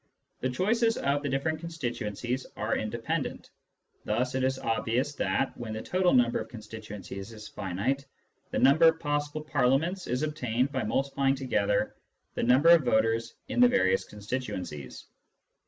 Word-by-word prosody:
The 130 - -1
choices 225 - +1
of 140 +1 +1
the 145 - -2
different 150 +4 -1
constituencies 125 - -3
are - - 0
independent; - - -3 0.5
thus 125 +2 0
it 130 0 0
is 130 0 +1
obvious 115 +4 0
that, 135 - 0
when 115 -2 -6
the 110 - -5
total 185 -1 +2
number 120 -2 +3
of - - -6
constituencies 105 -3 -8
is 105 -1 -10
finite, 105 +8 -2 0.4
the - - -2
number 145 +5 +6
of 160 0 +3
possible 145 0 -2
Parliaments 150 +6 +1
is 125 +4 -1
obtained 130 -4 0
by 135 -2 -1
multiplying 135 +4 +1
together 105 -7 0 0.4
the - - -2
numbers 145 +8 +7
of 155 - -5
voters 115 -1 +1
in - - -2
the 245 - +8
various 95 - +2
constituencies. 105 - -6
130 Hz, 150 wpm, -29 LUFS, 110-145 Hz, 0.5 s, the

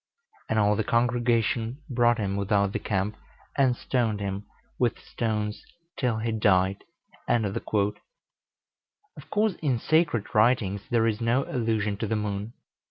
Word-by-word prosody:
And - - +1
all 105 -1 +4
the 110 - 0
congregation 120 +2 +1
brought 120 -2 +3
him 100 -3 -1
without 100 0 +1
the - - -1
camp, 105 +1 -1 0.4
and 130 -3 +3
stoned 115 -5 0
him 100 0 -4 0.3
with 120 -1 +1
stones 105 -2 -3 0.3
till 120 -4 0
he 115 +1 -1
died." 95 -3 +2 0.4
Of 105 -4 0
course, 215 - -4
in 145 -5 +1
the 120 - -1
sacred 150 - +1
writings 105 -3 +3
there 115 -2 +3
is 110 0 0
no 120 +4 +2
allusion 110 -5 -1
to 110 - -2
the 110 - 0
moon. 105 +1 -3
110 Hz, 140 wpm, -27 LUFS, 105-120 Hz, 0.4 s, all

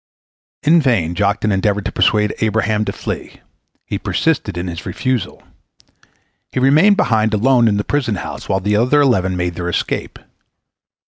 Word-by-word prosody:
In 165 +3 +5
vain 105 - +1
Joktan 105 +3 0
endeavored 100 +1 0
to - - -2
persuade 105 -1 +2
Abraham 110 -1 0
to - - -2
flee. - - -7 0.4
He - - -4
persisted 140 - -1
in 85 - -3
his 85 -2 -6
refusal. 105 +2 -3 1.1
He - - -2
remained 155 +10 +4
behind 110 -1 +1
alone 120 +2 +3
in 105 -2 +1
the 105 - -1
prison 130 -5 -1
house, - - -7
while 95 - 0
the 105 +2 0
other 125 +7 +3
eleven 95 -9 +1
made 90 0 -2
their 90 0 -4
escape. - - -3
105 Hz, 155 wpm, -17 LUFS, 95-130 Hz, 1.1 s, In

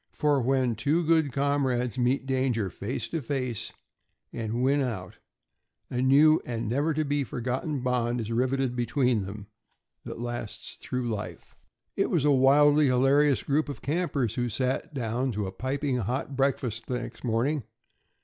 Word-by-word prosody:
For 145 -2 +2
when 130 -1 +1
two 150 +9 0
good 160 -3 +3
comrades 135 -3 0
meet 130 +2 +1
danger 130 -7 0
face 110 - -4
to 165 - -2
face 130 -3 -3 0.6
and 115 +1 -2
win 140 +2 +3
out, 105 -9 -4 0.7
a 125 - -1
new 145 +4 +5
and 115 -2 -4
never 140 +8 +1
to 155 0 0
be 145 0 0
forgotten 130 +4 -3
bond 125 -1 0
is 115 0 -4
riveted 130 +1 0
between 125 -3 +1
them 100 +1 -8 0.6
that - - -7
lasts 120 -2 -5
through 125 -1 -3
life. 105 -3 -6 0.4
It - - +1
was - - +1
a 145 - +5
wildly 145 +2 +5
hilarious 135 +2 +3
group 145 +2 0
of 140 -6 -7
campers 145 - -1
who 120 0 -1
sat 130 +3 -1
down 125 +1 -1
to 105 -1 -2
a 95 - -4
piping 130 +5 -2
hot 125 +5 -3
breakfast 125 -4 -1
the 125 -1 -1
next 120 0 -9
morning. 125 +5 0
130 Hz, 160 wpm, -27 LUFS, 120-140 Hz, 0.7 s, new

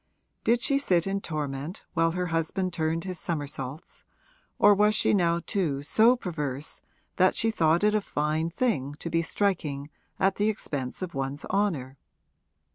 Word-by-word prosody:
Did 235 +2 +2
she 275 -1 +2
sit 180 - +2
in 195 0 -1
torment 150 +2 -4
while 165 -1 +2
her 180 0 -1
husband 175 +3 -1
turned 165 0 -1
his 185 -3 -4
somersaults, 145 -1 -5 0.5
or 205 - +7
was 210 +1 +3
she - - +3
now 170 -3 +2
too 155 -9 -1
so 225 +10 +5
perverse 150 - -4 0.4
that 185 0 +4
she 225 - +1
thought 165 -3 +2
it 210 0 +4
a 215 - +2
fine 155 -1 -1
thing 165 - -1
to 170 +2 -6
be 165 +1 +2
striking 155 -6 -1 0.3
at 195 0 +2
the 210 +1 +2
expense 145 -8 -3
of 180 - -5
one's 135 +2 -3
honour? 150 -10 -1
170 Hz, 160 wpm, -27 LUFS, 150-200 Hz, 0.5 s, or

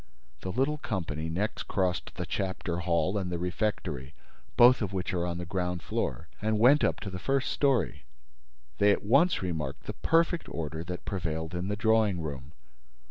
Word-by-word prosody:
The 95 - -4
little 135 +7 0
company 80 - -3
next 95 +7 -2
crossed 95 -3 -1
the - - -3
chapter 95 -3 -2
hall 85 +3 +1
and 90 -2 -3
the 85 - -1
refectory, 85 - -2 0.4
both 125 +1 +7
of 100 -3 -1
which 95 +1 -2
are 90 -1 0
on 85 -1 -3
the 90 - -4
ground 90 -1 -2
floor, - - -2
and 110 0 +1
went 130 +7 +6
up - - +1
to 100 - -5
the 90 - -5
first 135 +3 0
story. 125 - +1 0.7
They 105 0 +6
at - - 0
once 140 - +4
remarked 75 -6 -3
the - - -5
perfect 165 +1 +1
order 80 0 -4
that 90 0 -6
prevailed 80 -3 -3
in 90 +1 -2
the 105 - -1
drawing 110 -3 +3
room. 70 -2 -6
90 Hz, 180 wpm, -29 LUFS, 85-110 Hz, 0.7 s, both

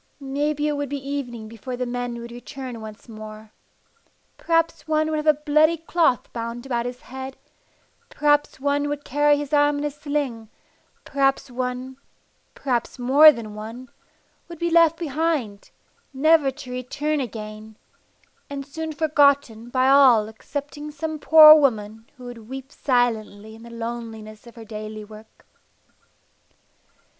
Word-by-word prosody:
Maybe 295 +2 -1
it - - +1
would 285 -1 -3
be 275 -1 -5
evening 245 -6 -5
before 230 +3 -7
the 250 - -2
men 245 -1 -4
would 235 0 -9
return 245 0 -8
once 215 +1 -11
more. 215 -1 -10 0.8
Perhaps 330 -1 0
one 310 0 +1
would 310 - 0
have 305 +1 -3
a 305 - +6
bloody 305 +2 +3
cloth 325 -5 0
bound 235 +1 -5
about 240 -2 -2
his 245 0 -7
head, 265 +1 -8 0.7
perhaps 295 -1 +1
one 285 +1 0
would 290 0 -5
carry 290 +2 +3
his 290 0 -5
arm 290 0 +3
in 285 - -3
a 295 - -1
sling; 285 -6 -4 0.6
perhaps 275 -1 0
one 255 +1 -4 0.7
maybe 245 -3 +2 0.2
more 275 +5 +7
than 230 -6 -8
one 225 +4 -9 0.6
would 340 -1 -10
be 340 +1 -1
left 330 -1 +5
behind, 295 - -2 0.5
never 305 0 +4
to 265 -1 -9
return 290 +5 -2
again, 215 -3 -7 0.7
and 280 -1 -6
soon 320 +3 -5
forgotten 280 -7 +2
by 255 +1 +2
all 260 -6 +6
excepting 290 +6 -7
some 310 +1 -5
poor 310 0 +9
woman 225 -7 0
who 250 - -13
would 235 -2 -10
weep 270 +1 -8
silently 220 -6 -1
in 225 - -14
the 235 - -12
loneliness 230 -2 -7
of 235 - -14
her 230 -1 -11
daily 215 0 -7
work. 215 +1 -16
265 Hz, 145 wpm, -23 LUFS, 230-295 Hz, 0.8 s, poor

